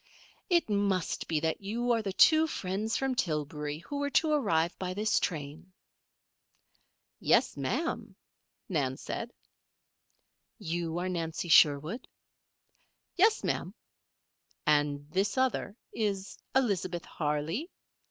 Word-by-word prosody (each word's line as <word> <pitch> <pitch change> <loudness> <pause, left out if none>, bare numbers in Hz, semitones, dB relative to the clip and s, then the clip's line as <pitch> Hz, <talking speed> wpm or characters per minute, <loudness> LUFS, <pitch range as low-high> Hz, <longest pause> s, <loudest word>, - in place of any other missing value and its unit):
"It 345 -2 +3
must 200 -4 0
be 160 -2 +1
that 160 +3 -1
you 235 +5 -1
are 230 -1 +2
the 200 -2 -3
two 315 +10 +6
friends 205 -2 -2
from 270 -1 0
Tillbury, 150 - -2
who 285 +7 -5
were 285 0 0
to 310 +2 +2
arrive 175 - +2
by 185 -1 -3
this 215 +2 +2
train." 155 +2 -4 1.5
"Yes, - - +3
Ma'am," 235 - -2 0.5
Nan 135 -7 -1
said. - - -5 1.3
"You 165 0 -3
are 180 +1 -1
Nancy 170 -1 -3
Sherwood?" 155 - +4 1.1
"Yes, 425 +5 +4
Ma'am." - - -2 0.9
"And 145 -2 +2
this 195 +7 0
other 255 -5 0 0.2
is 200 -3 -2 0.2
Elizabeth 185 -9 0
Harley?" 155 - -2
185 Hz, 115 wpm, -30 LUFS, 160-235 Hz, 1.5 s, two